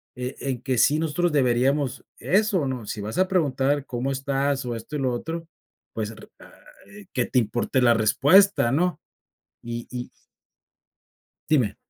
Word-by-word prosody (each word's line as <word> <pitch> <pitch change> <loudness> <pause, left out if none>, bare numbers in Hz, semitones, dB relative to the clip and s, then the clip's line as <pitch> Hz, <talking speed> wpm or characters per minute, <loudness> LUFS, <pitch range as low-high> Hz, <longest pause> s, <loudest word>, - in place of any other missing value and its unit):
eh, 125 +1 -5
en 130 -3 -3
que 130 -2 -1
sí 150 +2 +4
nosotros 165 +2 0
deberíamos 130 0 +1 0.2
eso, 195 -6 +1
¿no?, 125 -4 -4
si 105 - -4
vas 105 +2 -5
a 185 - +4
preguntar 145 -5 +1
cómo 125 +2 -2
estás, 135 0 -1
o 120 -1 -3
esto 115 +6 -7
y - - -4
lo 130 -2 0
otro, 165 +6 -5 0.5
pues, - - -3
r - - -13
ah. - - -15 0.4
Eh, 210 -2 -14
que 125 -4 +1
te 130 - +2
importe 120 +3 0
la 120 -1 +5
respuesta, 140 - +4
¿no?, 175 +6 +1 0.6
y 120 0 -6
y 125 -1 -5 1.4
Dime. 125 -10 +2
135 Hz, 160 wpm, -24 LUFS, 125-155 Hz, 1.4 s, la